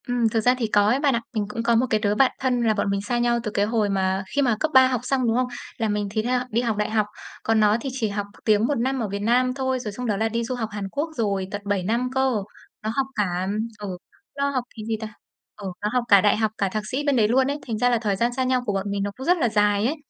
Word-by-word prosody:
Ừm, 245 -2 +2
thực 225 - +1
ra 250 +3 +4
thì 235 -3 -1
có 205 -1 +3
ấy 245 +5 +3
bạn 285 -2 +2
ạ. 235 - -1
Mình 215 -3 -1
cũng 230 +2 -4
có 235 0 +3
một 235 +3 +3
cái 215 - +2
đứa 210 -1 +1
bạn 265 +3 +4
thân 255 -2 +1
là 225 -2 +3
bọn 200 -1 -1
mình 200 0 0
xa 240 +4 -1
nhau 240 0 +2
từ 215 - -3
cái 200 0 +1
hồi 215 -1 +1
mà 190 0 0
khi 285 - +3
mà 245 -5 +2
cấp 315 - 0
3 260 0 +8
học 250 -2 -1
xong, 255 -1 0
đúng 225 - +2
không? 255 0 +1 0.3
Là 225 -2 0
mình 205 0 -1
thì 215 +1 0
theo 250 +2 +1
đi 235 +1 +1
học 230 -3 -1
đại 210 - 0
học. 215 -1 +2 0.4
Còn 225 0 +2
nó 210 0 +4
thì 270 - -3
chỉ 250 -4 -1
học 205 0 -3 0.2
tiếng 215 +1 +3
1 290 - 0
năm 260 +3 0
ở 225 - -1
Việt 200 +1 -3
Nam 250 +4 +2
thôi, 260 -1 -1
rồi 220 -4 -5
xong 250 +5 -6
đó 210 -4 0
là 220 +2 +1
đi 230 +1 -1
du 250 +2 -3
học 225 -3 -3
Hàn 205 -2 -5
Quốc 295 +9 -2
rồi, 200 -4 0
tận 205 - -4
7 200 -2 0
năm 235 +6 0
cơ. 265 -2 +2 0.5
Nó 215 - -1
học 270 -1 +1
cả 185 -3 -1 0.3
ừ, 195 -3 -5 0.4
nó 280 0 +1
học 260 -3 -1
cái 220 - -7
gì 225 -1 -1
ta, 215 -1 -6 0.4
ừ, 205 -2 -7
nó 210 - 0
học 250 -1 +2
cả 200 -3 +7
đại 205 +1 +3
học, 220 -1 +1
cả 195 - 0
thạc 215 +2 -3
sĩ 270 +3 -1
bên 285 -2 +2
đấy 220 -4 +4
luôn 260 +4 +3
ấy, 285 +1 -2
thành 225 -3 -2
ra 245 +3 +3
là 240 - +3
thời 205 -3 0
gian 235 +5 0
xa 260 +1 -1
nhau 255 0 +1
của 205 - -1
bọn 195 +1 -2
mình 200 0 -1
nó 205 - -2
cũng 265 - -6
rất 355 +1 +4
là 245 -8 +1
dài 210 -1 +2
ấy. 280 +6 +1
225 Hz, 315 wpm, -24 LUFS, 205-255 Hz, 0.5 s, 3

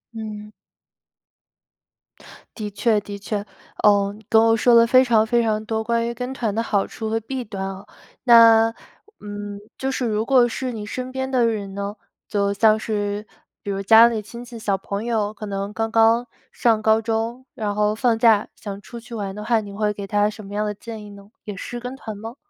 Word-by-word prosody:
嗯。 215 -1 -7 2.1
的 210 -2 -4
确 210 +2 +2
的 205 0 -7
确。 205 0 -3 0.4
哦， 200 -1 +4
你 220 - -16
跟 220 0 +6
我 225 0 +4
说 240 +2 +3
了 230 0 +7
非 255 +2 +6
常 225 -3 +3
非 235 +1 +2
常 215 -1 0
多， 220 0 -2
关 230 +1 0
于 235 - -3
跟 250 +2 -5
团 225 -6 -2
的 225 - 0
好 205 -3 +1
处 220 -1 -5
和 225 - 0
弊 250 +3 -5
端 200 -3 -6
啊。 195 +1 -7 0.4
那， 230 -2 +7 0.5
嗯， 205 -1 -7 0.2
就 265 0 -2
是 255 -1 -2
如 215 0 -1
果 250 -1 +5
是 255 +2 -4
你 215 -3 -6
身 255 +4 -5
边 265 0 -3
的 250 -3 +2
人 200 -3 -3
呢？ 200 +1 -4 0.3
就 200 -1 0
像 215 +1 +4
是， 205 -1 -3 0.4
比 - - -7
如 195 0 -2
家 225 +3 +8
里 230 -2 -1
亲 235 +3 -10
戚 240 -1 -10
小 205 -3 0
朋 200 +3 -5
友， 215 -3 0
可 215 - -8
能 200 0 -4
刚 225 0 -2
刚 230 +2 +4 0.2
上 225 -3 +2
高 220 0 +4
中， 225 +3 -2
然 210 -2 -3
后 210 0 +2
放 230 0 +1
假， 225 -3 +4
想 200 -1 -7
出 235 +1 -10
去 235 +1 -13
玩 200 -3 -4
的 210 - -6
话， 230 0 +2
你 205 -2 -8
会 210 +1 -1
给 200 -1 -7
他 205 0 +2
什 215 0 -10
么 200 - -9
样 210 - 0
的 210 - -2
建 220 0 -9
议 205 - -11
呢？ 200 0 -14
也 205 -2 -6
是 240 +4 -6
跟 250 +2 -6
团 220 -6 -8
吗？ 225 +4 -8
220 Hz, 225 characters per minute, -22 LUFS, 205-235 Hz, 2.1 s, 家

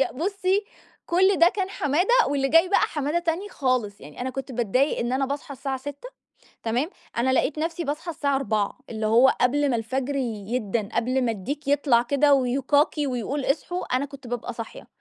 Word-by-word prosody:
يا 270 - +1
بُصّي، 390 +5 0 0.4
كل 380 +3 +3
ده 340 +1 +7
كان 380 0 -2
حمادة، 315 - 0 0.2
واللي 275 -1 0
جاي 330 +4 +5
بقى 400 - +3
حمادة 295 +2 0
تاني 345 +4 -2
خالص، 255 - -1
يعني 145 - -11
أنا 260 +1 -2
كنت 270 0 -6
باتضايق 250 +4 +1
إن 240 +2 -1
أنا 270 +1 +1
باصحى 280 +1 -5
الساعة 270 0 -3
06:00 285 - -8 0.6
تمام؟ 245 +7 0 0.3
أنا 260 +2 +2
لقيت 305 - +1
نفسي 330 +2 -2
باصحى 300 +4 -3
الساعة 285 -4 0
04:00 215 -7 -1
اللي 220 -1 -3
هو 240 +5 +6
قبل 285 +3 +3
ما 245 - +1
الفجر 260 +5 -2
يدَّن، 220 -3 -2
قبل 255 +3 0
ما 230 - +1
الديك 275 +9 -5
يطلع 280 -4 +3
كده 280 +3 +3
ويكاكي، 275 +3 +2
ويقول 255 +3 -2
اصحوا، 325 +1 -1
أنا 265 +2 0
كنت 275 -2 -12
بابقى 240 -1 -4
صاحية 230 -1 -8
270 Hz, 185 wpm, -25 LUFS, 245-300 Hz, 0.6 s, ده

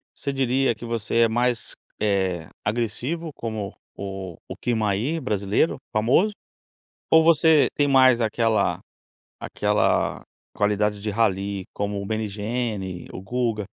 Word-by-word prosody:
você 140 - -3
diria 135 -1 +2
que 120 - -13
você 115 -1 -1
é - - +3
mais, 120 +1 0 0.3
eh, 95 -5 0 0.2
agressivo 120 +9 -2
como 110 -3 -5 0.2
o 95 -3 -6
o - - -7
Kirmayr 115 +6 0
brasileiro 105 +6 +1 0.2
famoso, 130 - +3 0.8
ou 160 0 +6
você 160 -2 +5
tem 145 -1 +2
mais 130 -3 +6
aquela 115 0 +1 0.6
aquela - - 0 0.3
qualidade 105 0 0
de 105 +1 -2
Rally 100 -3 0
como 100 0 -2
o 100 - -5
Meligeni, 105 -3 -3
o 95 - -7
Guga. 115 0 -1
110 Hz, 120 wpm, -24 LUFS, 100-125 Hz, 0.8 s, ou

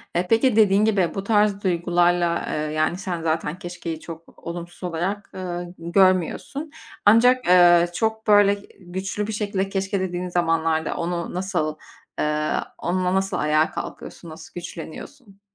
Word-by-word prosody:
Eee, 175 +1 +1
peki 225 +1 +3
dediğin 210 -1 +5
gibi 195 -6 +2
bu 195 - -3
tarz 210 -1 +2
duygularla, 175 -1 +1
eee, - - -2 0.2
yani 155 +3 0
sen 180 -3 -4
zaten 160 +1 -2
keşkeyi 175 -3 -6
çok 165 0 -11
olumsuz 175 +1 -7
olarak, 180 +4 -3
eee, 175 -1 -5
görmüyorsun. 185 - +1 0.3
Ancak, 245 +3 +5
eee, 175 -1 +6
çok 220 0 -1
böyle 205 -1 +6 0.3
güçlü 190 +3 -4
bir 220 - -4
şekilde 200 -2 -2
keşke 195 0 -1
dediğin 180 -1 -3
zamanlarda 165 -2 0
onu 170 0 -3
nasıl 180 -4 -2 0.4
eee, 150 0 0 0.2
onunla 180 +1 -1
nasıl 190 -1 0
ayağa 155 +1 +2
kalkıyorsun, 170 - -8
nasıl 160 +1 -12
güçleniyorsun? 195 - -9
180 Hz, 140 wpm, -23 LUFS, 170-200 Hz, 0.4 s, eee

